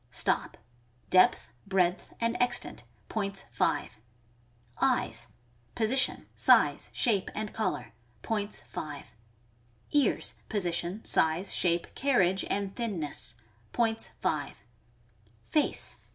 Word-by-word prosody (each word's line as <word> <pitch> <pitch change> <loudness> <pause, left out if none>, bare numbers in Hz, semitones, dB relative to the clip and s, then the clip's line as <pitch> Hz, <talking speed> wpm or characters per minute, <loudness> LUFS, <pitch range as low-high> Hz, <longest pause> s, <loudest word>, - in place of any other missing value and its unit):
Stop.— - - 0 0.5
Depth, 185 -9 +4 0.2
breadth, 185 -2 +1
and 230 0 0
extent. 245 -1 0 0.2
Points, 200 -3 -3
5. - - -1 0.8
Eyes. - - +1 0.2
— 120 0 -35
Position, 250 +3 +1
size, - - +4
shape, 205 -7 +1
and 215 0 -4
color.. 220 - -2 0.3
Points, 210 -2 -2
5. 145 -2 -7 0.8
Ears. 290 -2 +2
— - - -33
Position, 180 0 -1
size, 165 +4 +3
shape, 170 -1 0
carriage, 190 -9 +2
and 200 -1 -2
thinness. 170 - -1 0.4
Points, 225 -2 +1
5. 145 - -2 0.8
Face. 305 -2 0
195 Hz, 100 wpm, -29 LUFS, 175-225 Hz, 0.8 s, Depth